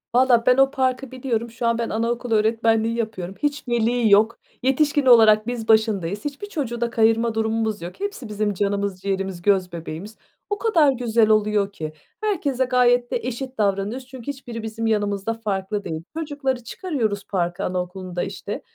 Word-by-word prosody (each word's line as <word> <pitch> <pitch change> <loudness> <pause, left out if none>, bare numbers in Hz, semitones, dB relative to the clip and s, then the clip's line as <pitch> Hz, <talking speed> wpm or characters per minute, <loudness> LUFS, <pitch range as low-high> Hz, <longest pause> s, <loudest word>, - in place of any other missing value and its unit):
Valla 245 -2 +4
ben 250 0 +5
o 270 0 +5
parkı 260 -1 -1
biliyorum. 245 -3 -2
Şu 235 0 -2
an 230 0 +2
ben 235 -1 -2
anaokulu 230 +1 -1
öğretmenliği 225 +1 +2
yapıyorum. 195 -5 -4
Hiç 290 -2 -1
veli 235 -1 +2
yok. 215 +3 +4 0.2
Yetişkin 285 +2 +2
olarak 220 -3 +6
biz 240 -2 -3
başındayız. 210 - +2
Hiçbir 290 +8 -5
çocuğu 250 - -3
da 235 - +1
kayırma 225 0 +2
durumumuz 220 -1 -1
yok. 175 +1 -8
Hepsi 400 - -5
bizim 210 0 -1
canımız 200 -1 -1
ciğerimiz, 195 -2 -2
göz 190 -1 +2
bebeğimiz. 170 +5 -7 0.3
O 410 - -1
kadar 335 - +4
güzel 230 -3 +2
oluyor 210 -2 +2
ki 155 -5 -6 0.3
herkese 285 - 0
gayet 245 -1 +3
de - - +1
eşit 255 +2 -5
davranıyoruz 205 +5 -1
çünkü 260 -3 -11
hiçbiri 240 -5 -8
bizim 225 +1 -3
yanımızda 205 0 0
farklı 205 -2 -3
değil. 160 0 -5
Çocukları 285 -5 -2
çıkarıyoruz 230 - -2
parka 175 0 -1
anaokulunda, 180 0 -3
işte, 200 +1 -5
225 Hz, 165 wpm, -23 LUFS, 205-250 Hz, 0.3 s, olarak